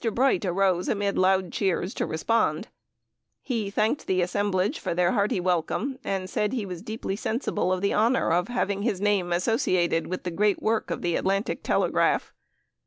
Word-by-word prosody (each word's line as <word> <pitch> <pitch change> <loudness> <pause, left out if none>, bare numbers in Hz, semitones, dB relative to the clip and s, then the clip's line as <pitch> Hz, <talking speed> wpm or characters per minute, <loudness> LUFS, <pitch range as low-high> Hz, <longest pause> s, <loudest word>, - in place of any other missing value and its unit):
Bright 250 -5 +2
rose, 185 0 +1
amid 200 -2 0
loud 185 -1 +2
cheers, 190 0 -1
to - - -2
respond. 185 +1 0 0.7
He 225 -6 -2
thanked 215 +7 0
the 185 -1 +2
assemblage 190 +1 0
for - - -3
their 175 0 +3
hearty 205 -4 +1
welcome, 185 - -1
and 190 -1 -2
said 210 +4 -1
he 235 -5 -2
was 180 -3 -7
deeply 215 -2 -4
sensible 220 -3 -1
of 185 -1 0
the 200 - +1
honor 230 +1 +2
of 175 +2 +2
having 200 -5 -1
his 210 -4 -1
name 200 -3 +1
associated 175 -3 +1
with 185 - -4
the 180 - -3
great 205 +4 +1
work 220 0 0
of - - -4
the 175 -1 0
Atlantic 195 +3 -1
Telegraph. - - +1
195 Hz, 175 wpm, -26 LUFS, 180-215 Hz, 0.7 s, their